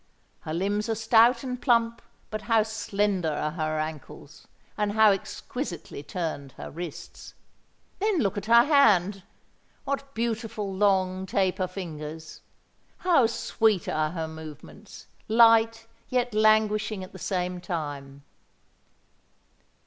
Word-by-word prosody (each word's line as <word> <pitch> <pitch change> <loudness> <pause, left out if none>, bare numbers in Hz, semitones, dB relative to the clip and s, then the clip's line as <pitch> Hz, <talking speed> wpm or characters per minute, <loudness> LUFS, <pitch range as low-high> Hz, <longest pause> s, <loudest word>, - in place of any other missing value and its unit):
Her 155 - -6
limbs 205 +4 -1
are 225 - +1
stout 230 +2 +4
and 250 -1 -5
plump; 235 -2 +2 0.3
but 215 0 -4
how 225 -2 +3
slender 205 -5 -1
are 150 +1 -2
her 155 -1 -2
ankles, 155 -2 -7 0.3
and 210 -1 -1
how 220 -1 +6
exquisitely 195 - -5
turned 145 -4 -5
her - - -9
wrists! 170 +1 -9 0.6
Then 415 -1 +1
look 200 - 0
at 205 +1 -5
her 235 +1 +7
hand. 210 - +4 0.6
What 275 0 -4
beautiful, 225 -3 -3
long 190 -1 +1
taper 185 -1 0
fingers! 160 -4 -8 0.6
How 335 -10 +3
sweet 220 -4 0
are 155 0 0
her 165 -1 -4
movements—light, 220 - 0 0.2
yet 250 -2 0
languishing 215 -1 +2
at 185 - -10
the 190 - -11
same 180 -1 -2
time!" 145 -6 -5
205 Hz, 120 wpm, -26 LUFS, 170-225 Hz, 0.6 s, her